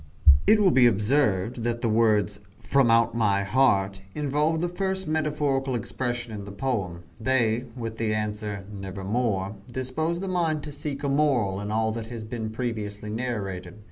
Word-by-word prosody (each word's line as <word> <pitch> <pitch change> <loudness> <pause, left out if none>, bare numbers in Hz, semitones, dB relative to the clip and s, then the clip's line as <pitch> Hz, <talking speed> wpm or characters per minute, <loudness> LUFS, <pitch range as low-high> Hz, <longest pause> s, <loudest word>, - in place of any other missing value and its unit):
It 215 - +6
will 195 -3 +5
be 125 -4 +6
observed 110 -1 +2
that 120 0 -1
the - - +1
words, 110 -2 +2 0.2
"from 135 -3 +2
out 115 0 +4
my 100 -4 +2
heart," 100 -3 +2
involve 150 +2 +1
the 175 - 0
first 190 +1 -2
metaphorical 145 -4 0
expression 120 0 -3
in 105 -1 -5
the 100 - -8
poem. 100 -7 -2 0.2
They, 120 -1 +1
with 115 -2 -5
the 115 -1 0
answer, 105 -2 -3
"Nevermore," 100 +1 -2
dispose 145 +7 -2
the 195 - -4
mind 165 -5 0
to 150 - -6
seek 145 -1 -5
a - - 0
moral 130 -9 +2
in 105 - -4
all 110 +1 +1
that 110 0 -5
has 115 -2 -6
been 110 0 -4
previously 105 -3 -4
narrated. 105 -7 -4
115 Hz, 165 wpm, -26 LUFS, 105-140 Hz, 0.2 s, It